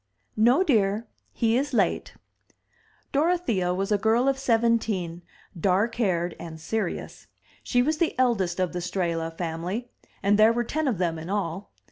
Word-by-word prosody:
"No, 240 Hz, -, +4 dB
dear. 215 Hz, -, +2 dB, 0.3 s
He 225 Hz, 0 st, +1 dB
is 275 Hz, +1 st, 0 dB
late." -, -, 0 dB, 1.0 s
Dorothea 280 Hz, -, +1 dB
was 195 Hz, +3 st, -2 dB
a 205 Hz, -, +3 dB
girl 225 Hz, +5 st, +2 dB
of 270 Hz, -1 st, +1 dB
seventeen, 225 Hz, -8 st, +1 dB, 0.3 s
dark 190 Hz, +6 st, +1 dB
haired 180 Hz, -7 st, 0 dB
and 160 Hz, -2 st, -8 dB
serious. 220 Hz, +7 st, -4 dB, 0.3 s
She 245 Hz, 0 st, +2 dB
was 305 Hz, +3 st, 0 dB
the 335 Hz, -, 0 dB
eldest 195 Hz, -9 st, +1 dB
of 185 Hz, -1 st, 0 dB
the 180 Hz, -, -2 dB
Strehla 170 Hz, -2 st, -2 dB
family; 180 Hz, +8 st, -4 dB, 0.3 s
and 205 Hz, +1 st, +3 dB
there 220 Hz, +2 st, +6 dB
were 240 Hz, +1 st, 0 dB
ten 305 Hz, +5 st, -2 dB
of 240 Hz, -7 st, 0 dB
them 165 Hz, -2 st, -1 dB
in 165 Hz, +3 st, -8 dB
all. 195 Hz, -1 st, -3 dB
210 Hz, 155 wpm, -26 LUFS, 180-240 Hz, 1.0 s, there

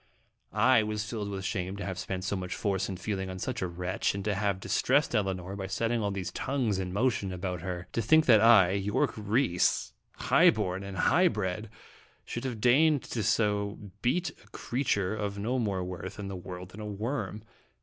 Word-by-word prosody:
I 120 Hz, +2 st, +5 dB
was 105 Hz, 0 st, -3 dB
filled 105 Hz, -2 st, -4 dB
with 95 Hz, -1 st, -4 dB
shame 95 Hz, 0 st, -2 dB
to 100 Hz, -, -5 dB
have 95 Hz, -1 st, -4 dB
spent 95 Hz, 0 st, -4 dB
so 100 Hz, +1 st, -1 dB
much 90 Hz, -1 st, -4 dB
force 95 Hz, -2 st, -1 dB
and 95 Hz, -2 st, -5 dB
feeling 95 Hz, -1 st, -3 dB
on 95 Hz, -, -5 dB
such 120 Hz, +5 st, -3 dB
a 95 Hz, -, 0 dB
wretch, 90 Hz, +2 st, -2 dB
and 100 Hz, 0 st, -4 dB
'to 105 Hz, -, +1 dB
have 100 Hz, -1 st, 0 dB
dis -, -, 0 dB
tressed 140 Hz, +2 st, +2 dB
Elinor 95 Hz, -3 st, -1 dB
by 95 Hz, -1 st, -4 dB
setting 115 Hz, +4 st, 0 dB
all 100 Hz, -, 0 dB
these 95 Hz, -3 st, -4 dB
tongues 125 Hz, -8 st, -1 dB
in 90 Hz, -1 st, -3 dB
motion 100 Hz, -2 st, 0 dB
about 90 Hz, -1 st, -4 dB
her; 90 Hz, 0 st, -5 dB
to 115 Hz, -, 0 dB
think 155 Hz, +8 st, +5 dB
that 110 Hz, -4 st, +6 dB
I, 110 Hz, -6 st, +7 dB
Yorke 100 Hz, +1 st, 0 dB
Rhys, 105 Hz, -3 st, +1 dB, 0.2 s
high -, -, +5 dB
born 90 Hz, +1 st, -1 dB
and 100 Hz, -1 st, -7 dB
high 180 Hz, -, +4 dB
bred, 95 Hz, -, -2 dB, 0.6 s
should 120 Hz, +2 st, -5 dB
have 120 Hz, -4 st, -3 dB
deigned 140 Hz, +5 st, +4 dB
to 115 Hz, -, -1 dB
so 105 Hz, -1 st, 0 dB
beat 175 Hz, +9 st, +1 dB
a -, -, -22 dB
creature 110 Hz, -6 st, -1 dB
of 100 Hz, -2 st, -3 dB
no 120 Hz, +6 st, -1 dB
more 100 Hz, -5 st, -1 dB
worth 90 Hz, +1 st, -6 dB
in 100 Hz, -1 st, -5 dB
the 95 Hz, -, -5 dB
world 90 Hz, 0 st, -8 dB
than 105 Hz, +4 st, -10 dB
a 105 Hz, -, -5 dB
worm. 105 Hz, 0 st, -3 dB
100 Hz, 205 wpm, -29 LUFS, 95-115 Hz, 0.6 s, I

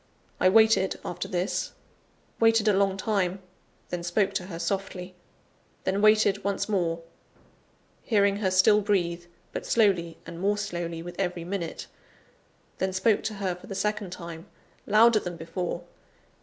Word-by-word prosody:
I 185 Hz, -, +5 dB
waited 220 Hz, -2 st, +4 dB
after 175 Hz, -, -4 dB
this 180 Hz, +1 st, -2 dB, 0.7 s
waited 225 Hz, -1 st, +4 dB
a 210 Hz, -, +5 dB
long 195 Hz, 0 st, +2 dB
time 195 Hz, -3 st, 0 dB, 0.5 s
then 175 Hz, -1 st, -3 dB
spoke 195 Hz, +3 st, +1 dB
to 185 Hz, -2 st, -3 dB
her 170 Hz, -4 st, -6 dB
softly 185 Hz, +1 st, -3 dB, 0.7 s
then 195 Hz, +2 st, 0 dB
waited 215 Hz, -2 st, +4 dB
once 200 Hz, -1 st, -1 dB
more; 170 Hz, -5 st, -1 dB, 1.0 s
hearing 200 Hz, -4 st, +2 dB
her 200 Hz, -2 st, 0 dB
still 195 Hz, +3 st, +5 dB
breathe, 175 Hz, -4 st, 0 dB, 0.3 s
but -, -, -4 dB
slowly 185 Hz, -7 st, +2 dB
and 170 Hz, -, -8 dB
more 205 Hz, +3 st, +1 dB
slowly 170 Hz, -4 st, -4 dB
with 175 Hz, 0 st, -9 dB
every 180 Hz, -3 st, -1 dB
minute 175 Hz, -2 st, -4 dB, 0.9 s
then 190 Hz, 0 st, 0 dB
spoke 200 Hz, +3 st, +2 dB
to 220 Hz, -, -2 dB
her 195 Hz, -2 st, -1 dB
for 180 Hz, -, -13 dB
the 195 Hz, -, -6 dB
second 210 Hz, 0 st, -1 dB
time, 170 Hz, 0 st, -8 dB, 0.4 s
louder 220 Hz, +2 st, +6 dB
than 175 Hz, -3 st, -6 dB
before. 170 Hz, +1 st, -4 dB
190 Hz, 145 wpm, -27 LUFS, 175-205 Hz, 1.0 s, louder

